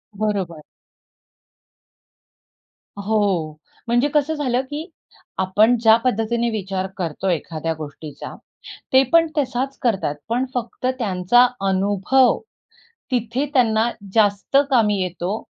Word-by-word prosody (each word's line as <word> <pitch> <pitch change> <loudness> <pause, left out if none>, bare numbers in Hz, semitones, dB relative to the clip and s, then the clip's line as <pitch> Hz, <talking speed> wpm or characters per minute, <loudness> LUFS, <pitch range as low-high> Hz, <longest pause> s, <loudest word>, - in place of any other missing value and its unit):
बरोबर. 195 -6 -2 2.4
हो, 200 -7 0 0.4
म्हणजे 240 +4 +2
कसं 295 +1 +2
झालं, 255 -4 0
की 295 +6 -7 0.5
आपण 210 +6 +3
ज्या 220 -1 +7
पद्धतीने 235 0 0
विचार 195 -3 -3
करतो 180 +1 -3
एखाद्या 165 -1 -2
गोष्टीचा, 150 0 -8 0.6
ते 260 +1 +7
पण 330 -1 +5
तसाच 270 -1 -1
करतात 195 - 0
पण 245 +3 0
फक्त 245 +1 -4
त्यांचा 210 +3 +3 0.2
अनुभव, 205 +7 +2 0.7
तिथे 245 +3 -1
त्यांना 230 -3 +3 0.2
जास्त 205 +3 +2
कामी 210 -5 +3
येतो 185 +3 -3
220 Hz, 100 wpm, -21 LUFS, 190-250 Hz, 2.4 s, ज्या